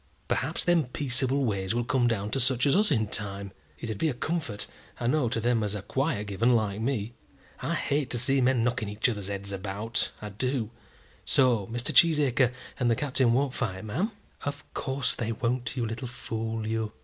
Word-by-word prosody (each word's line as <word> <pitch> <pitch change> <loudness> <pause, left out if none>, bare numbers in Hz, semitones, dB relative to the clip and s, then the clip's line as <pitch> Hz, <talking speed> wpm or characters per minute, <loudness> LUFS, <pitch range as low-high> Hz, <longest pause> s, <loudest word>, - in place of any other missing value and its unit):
Perhaps 150 +6 0
them 175 -4 +3
peaceable 130 +1 +1
ways 100 -1 -1
will 120 - +1
come 120 0 +2
down 105 -3 -1
to 135 - +1
such 125 -1 +3
as 140 - +4
us 210 +2 +4
in 110 -8 +2
time. 100 -1 -3 0.3
It'd 110 -4 -5
be 160 - +2
a 130 - -3
comfort, 145 -7 -2 0.3
I - - -3
know, 125 0 +2
to 115 - -1
them 120 0 +2
as 105 -1 -1
are 100 - -5
quiet 135 -5 -1
given, 105 +5 +2
like 110 -3 +1
me. 115 -2 -1 0.5
I - - -1
hate 140 -2 0
to 120 - -1
see 135 +3 +3
men 125 -2 +3
knocking 115 -3 0
each 105 +1 +1
other's 105 -5 -3
heads 100 0 -4
about, 100 +3 -2
I 105 - -6
do. 115 +2 -1 0.5
So 120 -7 +3
Mr. 120 +2 -3
Cheesacre 140 -6 +5 0.3
and 125 -2 +2
the 115 - +4
Captain 130 -2 +2
won't 135 +1 +1
fight, 95 -6 -3
ma'am?" 170 - -1 0.3
"Of 145 0 -4
course 135 -1 +1
they 115 -1 -2
won't, 120 +3 -2
you 120 - +1
little 115 +3 -4
fool, 115 -2 -4
you." 110 -1 -2
120 Hz, 195 wpm, -28 LUFS, 110-135 Hz, 0.5 s, Cheesacre